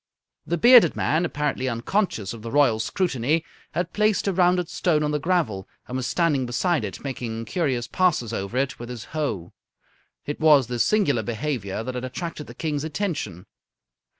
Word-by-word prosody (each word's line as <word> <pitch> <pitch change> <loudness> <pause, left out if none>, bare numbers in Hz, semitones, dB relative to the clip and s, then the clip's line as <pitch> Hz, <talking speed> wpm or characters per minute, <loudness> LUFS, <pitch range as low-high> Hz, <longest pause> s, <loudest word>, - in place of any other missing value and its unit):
The 170 - 0
bearded 235 -4 +7
man, 160 +4 +1
apparently 145 -4 -1
unconscious 115 - -1
of 115 - -9
the 115 - -6
Royal 135 -5 +3
scrutiny, 155 - 0 0.3
had 175 0 -2
placed 210 -1 +2
a 195 - +2
rounded 180 -1 +3
stone 165 -2 +1
on 150 - 0
the 150 - 0
gravel, 145 - 0 0.2
and 125 - -5
was 130 -2 -1
standing 150 -7 +1
beside 145 +4 0
it 100 - -6
making 115 -4 -4
curious 130 -4 -1
passes 155 - +1
over 100 +4 -3
it 135 0 -1
with 120 0 -7
his 120 -3 -7
hoe. 110 - -3 0.7
It 145 - -4
was 150 -4 +6
this 120 0 -2
singular 180 - +2
behaviour 110 -2 -3
that 130 +2 -4
had 125 0 -4
attracted 150 +4 -5
the - - -11
King's 150 -3 -2
attention. 145 - -3
145 Hz, 175 wpm, -24 LUFS, 120-170 Hz, 0.7 s, bearded